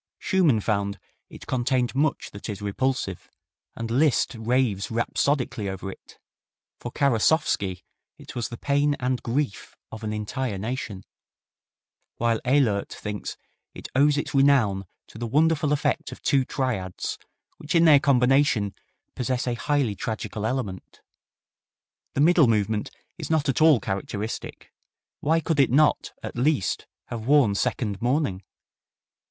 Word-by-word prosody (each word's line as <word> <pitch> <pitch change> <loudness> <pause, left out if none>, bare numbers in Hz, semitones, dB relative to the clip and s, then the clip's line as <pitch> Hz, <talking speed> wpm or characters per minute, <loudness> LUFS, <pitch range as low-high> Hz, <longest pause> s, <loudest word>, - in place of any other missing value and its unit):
Schumann 175 - +2
found 100 -1 -1 0.3
"it - - -12
contained 125 0 0
much 140 +2 0
that 100 +3 -8
is 100 -2 -4
repulsive," 105 -1 -2 0.5
and 115 0 -5
Liszt 140 +3 +2
raves 115 -3 0
rhapsodically 115 -2 0
over 95 0 -5
it; - - -15 0.6
for 120 - -6
Karasowski 115 - +1 0.3
it - - -12
was 120 -2 -2
the 120 - -7
"pain 145 +2 +1
and 125 0 -1
grief 125 -2 -3 0.2
of 110 0 -8
an 110 - -2
entire 105 +1 -3
nation," 110 -2 -4 1.1
while 115 -1 +1
Ehlert 125 -7 +2
thinks 105 -1 -5 0.4
"it - - -8
owes 145 +2 +4
its 145 - -3
renown 130 -9 +3 0.2
to 110 - -13
the 120 - -3
wonderful 150 +3 +2
effect 145 -1 0
of - - -11
two 135 -2 +3
triads, 110 -10 -3 0.4
which 150 +2 -4
in 165 0 +6
their 150 -3 +8
combination 130 -6 +3 0.4
possess 125 0 -1
a 125 - 0
highly 135 -2 0
tragical 110 +1 -4
element. 110 -7 -4 1.2
The 140 - +2
middle 165 -2 +6
movement 105 -1 0 0.3
is - - -5
not 155 -2 +1
at 135 +2 0
all 155 -5 +6
characteristic. 100 +2 -5 0.5
Why 160 +3 +2
could 160 -2 -1
it 135 - +5
not 150 +5 +3
at - - -6
least 125 - 0 0.2
have 115 -1 -5
worn 140 -7 +5
second 105 -2 -1
mourning? 120 -6 0
125 Hz, 135 wpm, -25 LUFS, 105-140 Hz, 1.2 s, their